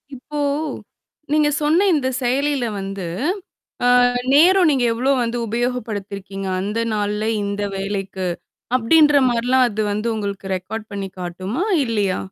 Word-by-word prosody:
இப்போ 295 +4 -7 0.9
நீங்க 300 -1 +4
சொன்ன 320 +7 +3
இந்தச் 260 -4 0
செயலில 270 +1 +1
வந்து 195 -1 -5 0.8
அ. - - +4 0.5
நேரம் 355 +3 +6
நீங்க 270 -4 +2
எவ்வளவு 260 +3 +1
வந்து 235 +1 -2
உபயோகப்படுத்தி 225 -3 -3
இருக்கீங்க, 195 0 -6
அந்த 210 +3 -2
நாள்ல 210 0 -1 0.2
இந்த 200 0 -2
வேலைக்கு 195 -1 -3 0.5
அப்படின்ற 295 +5 +5
மாதிரி 240 0 -1
எல்லாம் 260 0 +5
அது 215 0 -2
வந்து 215 +3 -2
உங்களுக்கு 200 -2 -4
ரெக்கார்ட் 215 +4 -6
பண்ணிக் 195 -2 -6
காட்டுமா 185 - -4 0.2
இல்லையா? 205 -5 0
230 Hz, 130 wpm, -20 LUFS, 200-260 Hz, 0.9 s, நேரம்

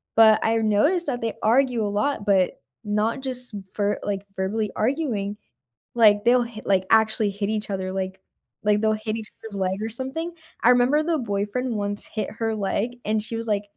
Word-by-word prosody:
but 220 -1 +7
I 225 0 +2
noticed 225 - +2
that 245 -4 -2
they 225 -1 -2
argue 240 -1 +3
a - - 0
lot, 210 +2 -1
but 190 -3 +2 0.2
not 210 +5 0
just 250 -3 -4 0.2
ver 205 0 0
like, 200 -1 -3
verbally 205 +3 -1
arguing, 215 -5 -1 0.6
like, 210 -3 +5
they'll 245 +1 +4
hit 230 -2 -9
like, 190 -1 +3
actually 220 -1 +3
hit 200 +1 -3
each 215 -1 -2
other, 190 -1 -3
like 190 0 -4 0.4
like, 210 0 +3
they'll 220 0 +3
hit 215 0 -3
each 220 -1 -6 0.2
other's 200 -2 -8
leg 190 +2 -1
or 220 - -1
something. 265 +9 -4 0.3
I 240 - +5
remember 250 +5 +4
the 325 0 0
boyfriend 225 +2 -2
once 205 0 -3
hit 215 -3 -4
her 225 -1 0
leg 215 +4 -2
and 215 0 +1
she 225 +1 -4
was 230 0 -4
like, 205 -1 +1
215 Hz, 190 wpm, -24 LUFS, 205-245 Hz, 0.6 s, but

